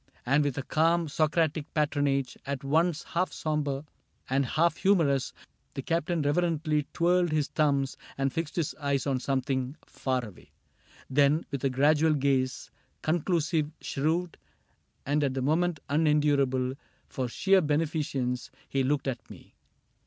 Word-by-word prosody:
lo -, -, -42 dB
CAPTAIN -, -, -30 dB
CRAIG 130 Hz, -, -1 dB
And 150 Hz, -, +4 dB
with 140 Hz, -2 st, -1 dB
a 135 Hz, -, -2 dB
calm 165 Hz, +3 st, +2 dB
Socratic 155 Hz, 0 st, 0 dB
patronage, 145 Hz, -3 st, +1 dB
At 140 Hz, 0 st, -3 dB
once 160 Hz, +3 st, +1 dB
half 180 Hz, +2 st, -1 dB
sombre 150 Hz, -2 st, -2 dB, 0.4 s
and 135 Hz, +1 st, +2 dB
half 165 Hz, +3 st, +2 dB
humorous, 160 Hz, -9 st, +2 dB, 0.4 s
The 135 Hz, -, -4 dB
Captain 165 Hz, 0 st, 0 dB
reverently 155 Hz, -1 st, +1 dB
twirled 175 Hz, 0 st, +2 dB
his 150 Hz, -2 st, 0 dB
thumbs 140 Hz, -3 st, +1 dB, 0.2 s
And 135 Hz, -1 st, 0 dB
fixed 165 Hz, -2 st, -3 dB
his 165 Hz, -4 st, -1 dB
eyes 140 Hz, -2 st, 0 dB
on 135 Hz, -2 st, 0 dB
something 130 Hz, 0 st, -1 dB
far 130 Hz, -2 st, -2 dB
away; 105 Hz, -6 st, -14 dB, 0.6 s
Then, 145 Hz, +4 st, +3 dB
with 140 Hz, -1 st, -4 dB
a -, -, +3 dB
gradual 150 Hz, +4 st, +3 dB
gaze, 135 Hz, -2 st, 0 dB, 0.3 s
conclusive, 160 Hz, -1 st, +1 dB
shrewd. 160 Hz, +5 st, -1 dB, 0.7 s
And 145 Hz, +2 st, +1 dB
at 135 Hz, -2 st, 0 dB
the 135 Hz, -, -1 dB
moment 165 Hz, +3 st, +1 dB
unendurable 145 Hz, -4 st, +2 dB, 0.3 s
For 130 Hz, -3 st, -3 dB
sheer 190 Hz, +10 st, +3 dB
beneficence, 145 Hz, -6 st, -1 dB, 0.2 s
he 135 Hz, -1 st, 0 dB
looked 135 Hz, +1 st, 0 dB
at 130 Hz, -, -4 dB
me. -, -, -14 dB
145 Hz, 145 wpm, -28 LUFS, 135-160 Hz, 0.7 s, And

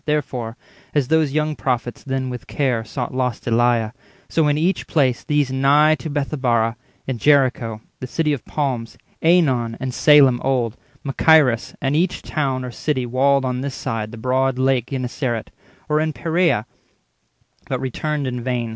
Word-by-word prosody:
Therefore, 130 Hz, -6 st, -2 dB, 0.4 s
as 140 Hz, -4 st, +1 dB
those 160 Hz, -3 st, +3 dB
young 155 Hz, +1 st, 0 dB
prophets 125 Hz, -3 st, -2 dB
then 130 Hz, -1 st, -2 dB
with 125 Hz, -2 st, -7 dB
care 125 Hz, -6 st, 0 dB
Sought 120 Hz, +3 st, -5 dB
lost 125 Hz, -2 st, -2 dB
Eliah, 120 Hz, -1 st, +2 dB, 0.4 s
so 160 Hz, -2 st, +1 dB
in 145 Hz, 0 st, +2 dB
each 175 Hz, +5 st, 0 dB
place 130 Hz, -7 st, +1 dB
these 145 Hz, -3 st, +1 dB
Nigh 145 Hz, +4 st, +4 dB
to 160 Hz, -, -5 dB
Bethabara—in 125 Hz, -4 st, -2 dB
Jericho 130 Hz, -5 st, +3 dB
20 110 Hz, -, -25 dB
The 130 Hz, -, -5 dB
city 150 Hz, +3 st, 0 dB
of 140 Hz, -, -4 dB
palms, 130 Hz, -6 st, -3 dB, 0.2 s
AEnon, 135 Hz, -9 st, +2 dB
and 130 Hz, -1 st, -4 dB
Salem 135 Hz, -5 st, +5 dB
old, 125 Hz, -4 st, 0 dB, 0.3 s
Machaerus, 135 Hz, -3 st, +3 dB
and 140 Hz, 0 st, 0 dB
each 175 Hz, +3 st, 0 dB
town 135 Hz, -4 st, -2 dB
or 125 Hz, -, -6 dB
city 130 Hz, 0 st, -2 dB
walled 135 Hz, +2 st, +2 dB
On 125 Hz, 0 st, -2 dB
this 140 Hz, -1 st, -4 dB
side 115 Hz, -4 st, -3 dB
the 115 Hz, -, -9 dB
broad 130 Hz, +2 st, 0 dB
lake 130 Hz, -2 st, +1 dB
Genezaret, 125 Hz, -3 st, -3 dB, 0.4 s
Or 150 Hz, 0 st, +2 dB
in 155 Hz, 0 st, 0 dB
Peraea—but 140 Hz, -, -4 dB
returned 145 Hz, +3 st, -2 dB
in 125 Hz, -1 st, -3 dB
vain. 120 Hz, -2 st, -2 dB
130 Hz, 155 wpm, -21 LUFS, 120-150 Hz, 0.4 s, Salem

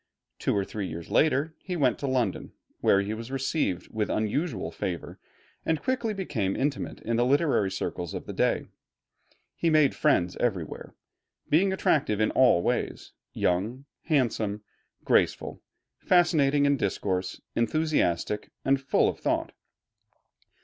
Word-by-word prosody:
Two -, -, 0 dB
or 100 Hz, -, 0 dB
three 100 Hz, -2 st, -4 dB
years 80 Hz, 0 st, -7 dB
later 155 Hz, +1 st, +2 dB
he 180 Hz, -, -5 dB
went 130 Hz, -8 st, +2 dB
to 140 Hz, -, -2 dB
London, 125 Hz, -7 st, -1 dB, 0.3 s
where 100 Hz, -, +4 dB
he 105 Hz, +2 st, -3 dB
was 115 Hz, +2 st, -7 dB
received 135 Hz, -, -1 dB
with 110 Hz, -1 st, -1 dB
unusual 110 Hz, -, -1 dB
favor 85 Hz, -1 st, -5 dB, 0.4 s
and 160 Hz, -1 st, 0 dB
quickly 250 Hz, -3 st, 0 dB
became 130 Hz, -, -2 dB
intimate 140 Hz, 0 st, -2 dB
in 115 Hz, 0 st, -1 dB
the 120 Hz, -, +3 dB
literary 140 Hz, -, +2 dB
circles 90 Hz, -2 st, -4 dB
of -, -, -6 dB
the -, -, -6 dB
day. -, -, +1 dB, 0.9 s
He 170 Hz, -, +1 dB
made 155 Hz, -3 st, +4 dB
friends 90 Hz, -, +2 dB
everywhere, 95 Hz, -10 st, -3 dB, 0.6 s
being 185 Hz, +6 st, +4 dB
attractive 150 Hz, -, +1 dB
in 110 Hz, -, +2 dB
all 125 Hz, -10 st, +4 dB
ways, -, -, -2 dB, 0.2 s
young, 110 Hz, +10 st, -1 dB, 0.2 s
handsome, 110 Hz, -8 st, 0 dB, 0.4 s
graceful, -, -, +1 dB, 0.4 s
fascinating 150 Hz, -6 st, +3 dB
in 140 Hz, 0 st, +3 dB
discourse, 95 Hz, -3 st, -2 dB, 0.2 s
enthusiastic, 115 Hz, -, 0 dB, 0.2 s
and 135 Hz, 0 st, +3 dB
full 135 Hz, -, +2 dB
of -, -, -2 dB
thought. -, -, -1 dB
125 Hz, 135 wpm, -27 LUFS, 100-150 Hz, 0.9 s, where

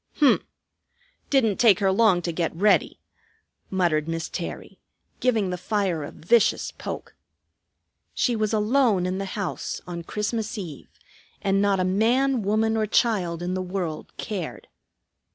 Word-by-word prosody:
"H'm! 285 Hz, -4 st, +5 dB, 0.9 s
Didn't 230 Hz, -8 st, +3 dB
take 220 Hz, -6 st, +6 dB
her 195 Hz, -2 st, +2 dB
long 190 Hz, -3 st, +3 dB
to 170 Hz, -, -1 dB
get 165 Hz, 0 st, -2 dB
ready!" 205 Hz, +5 st, +2 dB, 0.7 s
muttered 170 Hz, -5 st, +1 dB
Miss 165 Hz, 0 st, -3 dB
Terry, -, -, -6 dB, 0.4 s
giving 220 Hz, -7 st, +1 dB
the 180 Hz, -, -4 dB
fire 185 Hz, -4 st, -1 dB
a -, -, -6 dB
vicious 220 Hz, +8 st, +2 dB
poke. -, -, -7 dB, 1.0 s
She 245 Hz, -, +1 dB
was 215 Hz, -1 st, 0 dB
alone 215 Hz, -3 st, +2 dB
in 185 Hz, +1 st, -2 dB
the 195 Hz, -, -2 dB
house, 195 Hz, -3 st, -3 dB
on 175 Hz, -1 st, -5 dB
Christmas 220 Hz, +5 st, -3 dB
Eve, 170 Hz, -8 st, -7 dB, 0.5 s
and 195 Hz, 0 st, +2 dB
not 200 Hz, -1 st, +2 dB
a -, -, +2 dB
man, 235 Hz, +7 st, +2 dB
woman, 220 Hz, +2 st, +1 dB
or 215 Hz, -1 st, +1 dB
child 185 Hz, -7 st, +1 dB
in 180 Hz, +1 st, -2 dB
the 185 Hz, -, -1 dB
world 180 Hz, -4 st, -4 dB
cared. 190 Hz, -7 st, -5 dB
195 Hz, 145 wpm, -25 LUFS, 180-220 Hz, 1.0 s, take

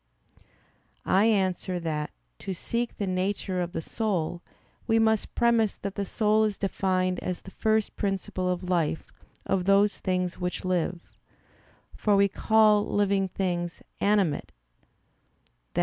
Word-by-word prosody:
I 195 Hz, +3 st, +4 dB
answer 185 Hz, -4 st, +1 dB
that, 155 Hz, -3 st, -2 dB, 0.3 s
To 190 Hz, -2 st, -4 dB
seek 235 Hz, +6 st, -3 dB
the 205 Hz, -, -1 dB
nature 185 Hz, 0 st, -1 dB
of 175 Hz, 0 st, -3 dB
the 165 Hz, -, -4 dB
soul, 175 Hz, -6 st, -2 dB, 0.5 s
we 225 Hz, -1 st, +3 dB
must 220 Hz, -1 st, +1 dB
premise 230 Hz, -3 st, +2 dB
that 200 Hz, -1 st, -5 dB
the 200 Hz, -1 st, -3 dB
soul 215 Hz, +1 st, +2 dB
is 210 Hz, -2 st, 0 dB
defined 185 Hz, -2 st, 0 dB
as 180 Hz, -, -4 dB
the 190 Hz, -, -11 dB
first 220 Hz, 0 st, 0 dB
principle 190 Hz, -2 st, -2 dB
of 180 Hz, 0 st, -3 dB
life 170 Hz, -3 st, 0 dB, 0.3 s
of 185 Hz, -2 st, 0 dB
those 200 Hz, +1 st, +4 dB
things 180 Hz, -1 st, -1 dB
which 180 Hz, +1 st, -3 dB
live: 180 Hz, -1 st, -2 dB, 0.8 s
for 210 Hz, -1 st, +2 dB
we 200 Hz, 0 st, +5 dB
call 215 Hz, 0 st, +4 dB
living 200 Hz, -1 st, +2 dB
things 175 Hz, -2 st, -3 dB, 0.2 s
"animate," 200 Hz, -7 st, +1 dB, 1.2 s
[*i. -, -, +1 dB
195 Hz, 135 wpm, -27 LUFS, 180-210 Hz, 1.2 s, we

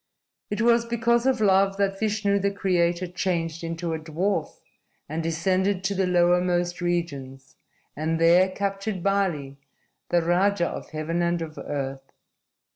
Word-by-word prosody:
"It 210 Hz, +1 st, -2 dB
was 235 Hz, 0 st, +4 dB
because 235 Hz, +1 st, +1 dB
of 260 Hz, -2 st, +2 dB
love 195 Hz, -1 st, +3 dB
that 195 Hz, -1 st, 0 dB
Vishnu, 205 Hz, -2 st, +1 dB
the 200 Hz, +1 st, +1 dB
Creator, 180 Hz, -3 st, 0 dB
changed 170 Hz, -2 st, -2 dB
into 165 Hz, 0 st, -3 dB
a 160 Hz, -, -3 dB
dwarf 160 Hz, +2 st, -2 dB, 0.5 s
and 155 Hz, +3 st, -3 dB
descended 185 Hz, +4 st, 0 dB
to 195 Hz, +1 st, 0 dB
the 190 Hz, -1 st, 0 dB
lowermost 175 Hz, 0 st, +2 dB
regions, 140 Hz, -7 st, -3 dB, 0.4 s
and 160 Hz, +2 st, -1 dB
there 175 Hz, +3 st, +5 dB
captured 195 Hz, 0 st, -3 dB
Bali, 170 Hz, -9 st, -1 dB, 0.5 s
the 175 Hz, -1 st, +2 dB
Raja 175 Hz, +1 st, +2 dB
of -, -, -7 dB
Heaven 155 Hz, +2 st, -2 dB
and 170 Hz, 0 st, +1 dB
of 155 Hz, -1 st, -8 dB
Earth. 135 Hz, -1 st, -5 dB
175 Hz, 140 wpm, -25 LUFS, 165-195 Hz, 0.5 s, there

